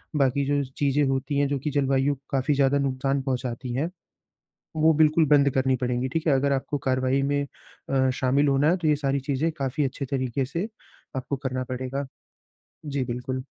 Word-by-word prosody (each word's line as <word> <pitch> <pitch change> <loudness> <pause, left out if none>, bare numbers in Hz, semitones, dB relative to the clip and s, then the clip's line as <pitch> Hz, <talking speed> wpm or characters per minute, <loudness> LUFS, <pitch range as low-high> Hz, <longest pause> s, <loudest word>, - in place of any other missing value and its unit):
बाकी 140 -1 +2
जो 145 0 +1
चीज़ें 145 0 +2
होती 135 +1 -1
है 145 - +3
जो 140 0 -1
कि 150 - -2
जलवायु 135 0 +2 0.2
काफ़ी 135 +2 +1
ज़्यादा 140 0 +3
नुकसान 135 0 0
पहुँचाती 125 -2 -3
हैं, 145 +7 -1 0.9
वो 160 +1 +4
बिल्कुल 155 +1 +4
बंद 140 -1 +5
करनी 130 0 +2
पड़ेंगी। 125 0 -1
ठीक 165 +4 -2
है? 150 - +5
अगर 140 +1 +2
आपको 135 +2 -2
कार्रवाई 130 +1 +2
में 145 +1 +1 0.5
अ, 130 -1 +2
शामिल 135 +3 +2
होना 140 +2 +3
है, 180 - +2
तो 170 -3 -2
ये 150 - +4
सारी 140 -1 0
चीज़ें 140 +4 -1
काफ़ी 140 -1 -2
अच्छे 135 +1 -3
तरीके 130 0 -1
से 170 - -3 0.5
आपको 130 +2 -2
करना 130 -1 -3
पड़ेगा। 130 +2 -4 0.8
जी 140 -2 -1
बिल्कुल। 125 +1 -4
135 Hz, 180 wpm, -25 LUFS, 130-145 Hz, 0.9 s, बंद